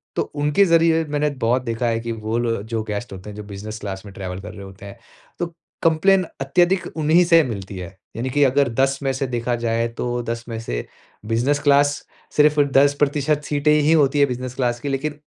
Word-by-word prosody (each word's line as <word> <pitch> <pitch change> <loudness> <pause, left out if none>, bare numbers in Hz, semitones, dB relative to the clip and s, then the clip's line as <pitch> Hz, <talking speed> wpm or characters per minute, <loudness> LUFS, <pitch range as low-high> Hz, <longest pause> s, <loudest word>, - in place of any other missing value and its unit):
तो - - +1 0.2
उनके 150 +7 +4
ज़रिये 165 -1 +4
मैंने 150 0 0 0.2
बहुत 125 +3 +2
देखा 115 0 -2
है 115 0 0
कि 115 0 -4
वो 110 +1 -3
लो 115 -3 -1
जो 110 0 -3
गेस्ट 105 +1 -5
होते 95 +2 -9
हैं, 105 - -9
जो 105 - -6
बिज़नेस 105 +2 -7
क्लास 95 -1 -6
में 100 - -10
ट्रैवल 95 -1 -6
कर 100 - -9
रहे 100 - -9
होते 95 +1 -12
हैं 100 +4 -11 0.4
तो 175 - 0 0.4
कंप्लेन 180 +4 +4 0.2
अत्यधिक 175 +7 +2
उन्हीं 160 +3 +4
से 165 -1 +6
मिलती 100 -6 -6
है। 90 +1 -8 0.2
यानी 120 +3 -2
कि 145 +3 +2
अगर 135 0 +3
10 135 +1 +3
में 135 - +1
से 135 +1 -2
देखा 120 0 -1
जाए, 115 0 +1
तो 120 +1 -3
10 115 0 -4
में 115 -1 -4
से - - -4 0.4
बिज़नेस 120 +6 +1
क्लास 145 0 +3 0.3
सिर्फ़ 150 0 +5 0.2
10% 145 +1 +2
सीटें 145 +1 +1
ही 150 +1 +3
होती 145 -2 +3
हैं 140 - +5
बिज़नेस 125 0 -5
क्लास 120 -2 0
की, 140 - -4
लेकिन 145 +2 -3
125 Hz, 210 wpm, -21 LUFS, 115-145 Hz, 0.4 s, से